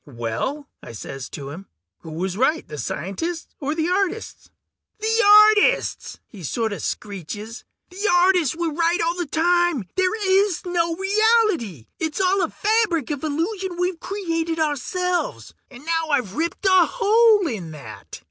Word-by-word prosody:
"Well," 125 - -4
I - - -10
says 135 +4 -7
to 140 -1 -7
him, 185 +6 -10 0.3
"who 165 - -11
was 180 +4 -3
right, 265 +9 +1
the 150 -1 -8
scientists 200 - -4
or 295 +1 -2
the 320 0 0
artists?" 390 +4 -2 0.5
"The 445 +1 +1 0.4
artists!" - - 0
he 205 - -13
sorta 220 - -2
screeches. 205 +3 -6 0.3
"The 395 +3 -3
artists 355 -5 +3
were 335 -2 -2
right 335 +2 +1
all 335 +1 +1
the 350 -3 -3
time... 345 - +1
there 375 +2 +1 0.3
is 365 - -5
no 340 -2 0
reality! 390 - +1
It's 315 +1 -2
all 380 +1 +2
a 335 - 0
fabric 415 - 0
of 290 -1 -4
illusion 350 +5 -2
we've 360 -1 -1
created 330 -5 -3
ourselves! 345 +4 -2 0.2
And 265 +2 -14
now 325 -1 0
I've 250 -10 0
ripped 335 - -3
a 375 -3 +5
hole 445 -3 +4
in 210 - -4
that!" 155 -3 -10
330 Hz, 150 wpm, -22 LUFS, 230-370 Hz, 0.5 s, a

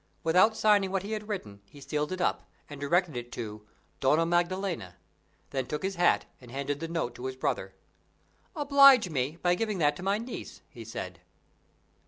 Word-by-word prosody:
Without 185 +7 +4
signing 205 -3 +4
what 190 0 -1
he 205 - -6
had 210 -1 -4
written, 105 - -5
he 145 - -14
sealed 150 +3 -2
it 185 - -3
up, 180 - -1 0.2
and 145 -1 -10
directed 170 +1 +1
it 120 0 -6
to 105 -2 -7 0.3
"Donna 150 +5 +3
Maddalena"; 175 - -1 0.6
then 130 -2 -2
took 150 - -4
his 195 +1 -1
hat, 175 -1 +3 0.2
and 125 - -13
handed 140 +2 -3
the 165 - -4
note 165 -7 -2
to 125 - -8
his 130 - -5
brother. 130 - -2 0.8
"Oblige 275 - +6
me 140 +2 -1
by 175 0 +4
giving 210 +2 -1
that 150 -3 +2
to - - -8
my 195 +2 +1
niece," 235 +3 -8
he - - -10
said. - - -7
170 Hz, 185 wpm, -29 LUFS, 140-195 Hz, 0.8 s, Oblige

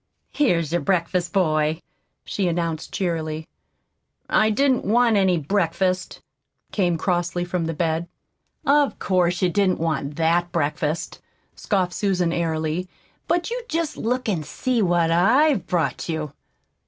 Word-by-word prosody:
"Here's 170 - +1
your 175 0 +1
breakfast, 175 +1 0
boy," 155 -4 +1 0.5
she 195 -3 -1
announced 165 -2 -2
cheerily. 160 -4 -2 0.8
"I 215 - +3
didn't 260 +4 +2
want 230 +2 +3
any 190 -3 +3
breakfast," 185 +2 -1 0.5
came 175 -5 +1
crossly 175 0 -1
from 175 -1 -2
the 165 - -3
bed. 165 +1 -1 0.6
"Of 285 0 +3
course 180 -1 +1
you 180 - +4
didn't 190 0 +2
want 150 -3 -2
THAT 170 +2 +1
breakfast," 155 -1 -2 0.3
scoffed 185 -4 -1
Susan 180 -4 0
airily; 160 +1 -1 0.4
"but 345 +5 0
you - - -2
just 325 -2 -1
look 250 +2 -2
an' 185 -7 0
see 240 - -1
what 175 -3 +2
I'VE 225 - +3
brought 175 -1 -1
you!" 155 -3 -3
175 Hz, 130 wpm, -23 LUFS, 165-200 Hz, 0.8 s, you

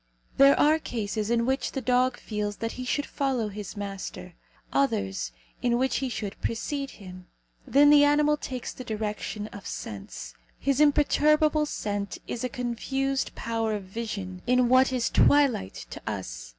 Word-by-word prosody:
There 275 +1 +7
are 310 +2 +5
cases 215 -5 -3
in 235 0 +2
which 265 +2 -1
the 270 - -1
dog 255 0 +2
feels 210 -1 -3
that 230 +2 -3
he 255 - -6
should 290 +3 0
follow 260 -6 -1
his 205 0 -7
master; 195 -3 -6 0.4
others, 95 - 0 0.3
in 240 -1 +2
which 260 +1 +1
he 265 - -1
should 210 -4 -5
precede 275 +4 -2
him. 185 -2 -11 0.4
Then 290 +1 +6
the 290 -1 +8
animal 295 +1 +4
takes 255 -4 -5
the 255 - -8
direction 210 -2 -4
of 200 - -10
sense. 95 - -7 0.2
His 275 +1 +1
imperturbable 300 +1 +4
scent 205 -6 -3
is 235 - -4
a 255 - -1
confused 270 +3 -2
power 225 -1 -1
of 205 - -5
vision 190 -2 -5
in 250 0 +4
what 260 +1 +5
is 250 -2 0
twilight 275 - +3
to - - -7
us. - - -5
235 Hz, 160 wpm, -27 LUFS, 205-275 Hz, 0.4 s, the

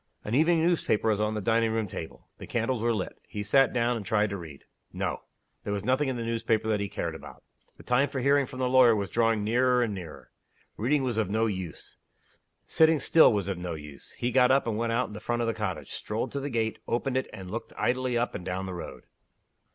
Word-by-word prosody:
An 105 - -4
evening 160 +4 +4
newspaper 160 -11 +1
was 105 -1 +1
on 105 0 0
the 105 - -2
dining 115 +2 +2
room 110 -1 -1
table. 80 -3 -8
The - - -9
candles 115 0 -1
were 120 +1 +2
lit. 105 -5 -3
He 105 - -5
sat 135 +4 +4
down, 120 0 +1
and 110 - -4
tried 105 -1 +1
to 100 - -3
read. 80 -6 -10 0.3
No! - - -3 0.4
There - - -3
was 100 -1 -3
nothing 130 +4 +1
in 130 - -2
the 115 - -3
newspaper 115 -1 0
that 105 -1 +1
he 100 -1 -2
cared 85 -1 -3
about. 80 - -11 0.3
The - - -14
time 130 +3 +2
for 140 -1 -3
hearing 140 +1 +3
from 130 - -9
the 130 -1 0
lawyer 125 -3 +6
was 100 -2 -3
drawing 115 -2 +2
nearer 125 +3 +3
and 110 -3 -2
nearer. 90 -5 -9 0.4
Reading 135 +6 +1
was 120 -4 -1
of 105 -4 0
no 110 +2 +1
use. 95 -6 -5 0.7
Sitting 160 -1 +4
still 160 +4 +6
was 100 -4 -1
of 95 -3 -3
no 90 -2 -4
use. 75 -2 -11
He 120 - -2
got 125 -1 +5
up, 135 +1 +3
and 115 -2 -1
went 115 +1 -1
out 120 +2 +1
in - - -10
the 105 - -7
front 120 +2 -1
of - - -1
the 115 - +1
cottage 95 -8 -4
strolled 110 +2 -3
to 140 - -3
the 140 +1 -4
gate 115 -3 -1
opened 125 +2 -1
it 130 - -1
and 95 -1 -9
looked 115 - -5
idly 125 0 0
up 120 +1 0
and 90 - -6
down 95 +1 -3
the 95 - -5
road. 85 - -8
115 Hz, 245 wpm, -28 LUFS, 105-125 Hz, 0.7 s, lawyer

